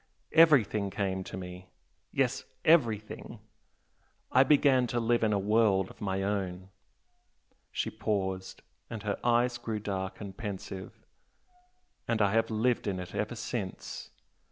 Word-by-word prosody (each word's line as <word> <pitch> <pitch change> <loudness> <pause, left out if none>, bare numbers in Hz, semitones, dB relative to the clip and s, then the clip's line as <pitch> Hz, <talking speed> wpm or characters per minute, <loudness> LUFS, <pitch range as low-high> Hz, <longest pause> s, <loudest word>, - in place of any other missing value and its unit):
Everything 130 - +5
came 95 -2 -2
to - - -6
me! 90 0 -8 0.4
yes, - - 0 0.2
everything! 115 -10 +2 0.9
I 130 - +6
began 135 -3 +4
to 120 - -1
live 120 +1 +2
in 110 - +3
a 105 - +2
world 100 -2 +2
of - - -18
my 95 -1 -1
own 95 -2 -2 0.5
" - - -43
she - - -2
paused, 95 -3 -2 0.3
and 110 -2 -6
her 105 -1 -2
eyes 120 0 +2
grew 115 -2 -3
dark 95 -1 -4
and 100 -2 -7
pensive, 95 -3 -7 1.0
"and 115 -1 +1
I 100 -2 +3
have 115 +1 +2
lived 115 +1 +1
in 95 -2 -1
it 90 - -7
ever 110 +3 -2
since. 110 -3 -5
105 Hz, 140 wpm, -30 LUFS, 95-115 Hz, 1.0 s, I